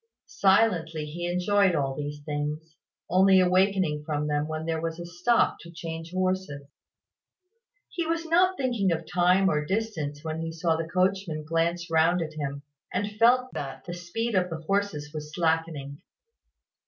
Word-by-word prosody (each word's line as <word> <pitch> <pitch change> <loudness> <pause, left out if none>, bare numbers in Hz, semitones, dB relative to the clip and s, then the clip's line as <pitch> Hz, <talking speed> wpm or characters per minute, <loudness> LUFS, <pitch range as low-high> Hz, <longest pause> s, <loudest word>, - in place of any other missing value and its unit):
Silently 180 -6 +2
he 170 +3 -4
enjoyed 180 +1 +2
all 135 -3 0
these 145 0 -5
things, 150 +2 -4 0.3
only 190 +2 +5
awakening 185 -4 +2
from 150 -1 -2
them 150 0 0
when 155 0 -4
there 165 -1 -1
was 165 0 -3
a 175 - -5
stop 175 +8 +2
to 170 - -12
change 165 0 -7
horses. 185 -6 -1 1.2
He 340 -2 -3
was 330 0 -1
not 365 +3 +3
thinking 240 -8 +1
of 165 0 -2
time 180 +3 +3
or 150 -5 +1
distance 160 -7 -3
when 160 0 -3
he 165 0 -3
saw 165 0 0
the 165 0 -4
coachman 185 -3 0
glance 165 +2 -1
round 165 +2 +4
at 155 -1 -7
him, 140 -2 -4 0.3
and 205 0 -2
felt 250 +2 +4
that 135 -2 -6
the 175 - -5
speed 200 +7 -3
of 180 -2 +2
the 160 -1 -5
horses 165 -5 -2
was 150 -1 -6
slackening. 160 -4 -1
170 Hz, 160 wpm, -27 LUFS, 155-190 Hz, 1.2 s, only